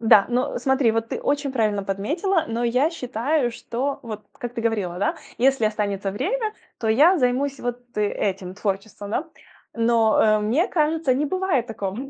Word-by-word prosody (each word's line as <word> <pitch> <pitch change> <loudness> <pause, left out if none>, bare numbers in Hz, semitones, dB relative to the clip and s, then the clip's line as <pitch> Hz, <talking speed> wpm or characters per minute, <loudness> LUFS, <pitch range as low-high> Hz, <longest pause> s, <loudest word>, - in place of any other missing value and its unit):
Да, 220 -3 +6
ну, 250 +3 0
смотри, 265 -3 +2
вот 225 0 -1
ты - - -4
очень 285 -1 0
правильно 215 -5 +1
подметила. 310 - 0
Но 235 +1 -1
я 255 +7 +2
считаю, 255 -1 -1
что 255 +4 -3
вот 215 -2 -7
как 245 0 -7
ты 230 - -3
говорила, 205 -6 -1
да, 200 - 0 0.2
если 265 -2 +3
останется 205 -2 -1
время, 430 - -1 0.3
то 225 - -2
я 310 +11 +5
займусь 265 +2 +1
вот 245 0 -3 0.2
этим 195 -3 -1
творчеством, 200 0 -4
да. 315 +8 -2 0.4
Но, 230 -1 +3
э, 215 -1 +4
мне 235 - +1
кажется, 310 -4 +1
не 290 +3 0
бывает 370 -9 0
такого 200 -3 -4
235 Hz, 170 wpm, -23 LUFS, 215-285 Hz, 0.4 s, Да